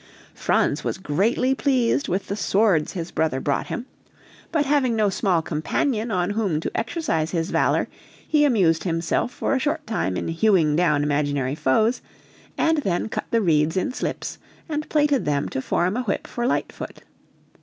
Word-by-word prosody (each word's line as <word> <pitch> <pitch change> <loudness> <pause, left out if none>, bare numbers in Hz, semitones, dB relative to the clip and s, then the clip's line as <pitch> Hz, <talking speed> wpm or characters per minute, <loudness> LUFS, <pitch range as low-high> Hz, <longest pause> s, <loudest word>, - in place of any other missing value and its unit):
Franz - - +1
was - - -2
greatly 205 - +1
pleased 265 -1 +1
with 190 +3 -1
the 200 - -3
"swords" 200 -6 +2
his 170 -2 -5
brother 160 -5 0
brought 140 +1 -1
him; 240 - -4 0.7
but 310 -3 +1
having 270 -4 +2
no 210 -2 +2
small 185 -5 +1
companion 215 - -1
on 180 -2 0
whom 205 -7 0
to - - -5
exercise 225 - -1
his 165 0 -2
valor, - - +2 0.4
he 300 -1 +3
amused 190 - +3
himself 165 +6 0
for - - -1
a 270 - +2
short 290 +3 -1
time 95 - -1
in - - -3
hewing 165 -3 +3
down 150 -4 +2
imaginary 145 -2 0
foes, 165 - +1 0.6
and 320 -1 +2
then 195 -5 -1
cut - - -3
the 230 - +2
reeds 160 0 +2
in 185 - 0
slips, - - -4 0.3
and 305 -1 -3
plaited 295 -4 +2
them 145 -1 0
to 130 - -3
form 180 +8 0
a 250 - 0
whip 210 -6 -2
for 240 0 -2
Lightfoot. - - -3
195 Hz, 170 wpm, -23 LUFS, 160-245 Hz, 0.7 s, he